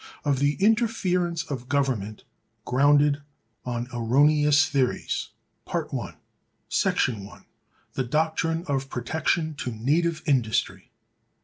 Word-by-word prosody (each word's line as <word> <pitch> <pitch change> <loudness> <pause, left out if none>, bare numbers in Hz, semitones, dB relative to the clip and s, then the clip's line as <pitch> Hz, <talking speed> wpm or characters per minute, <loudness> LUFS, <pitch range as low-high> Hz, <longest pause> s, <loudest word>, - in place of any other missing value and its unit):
Of 140 -2 +1
An 145 +1 +2
Interference 190 -6 +1
Of 125 -3 -6
Government 125 -8 -1 0.4
Grounded 145 +2 +3 0.4
On 120 -1 -3
Erroneous 145 +5 +4
Theories. 130 -5 -1 0.4
§ - - -3
1. 100 -5 -3 0.5
The 130 - -1
doctrine 160 +4 0
of 135 -2 -2
Protection 160 +6 -1
to - - -3
Native 155 +9 0
Industry. 125 -8 0
145 Hz, 95 wpm, -25 LUFS, 125-160 Hz, 0.5 s, Erroneous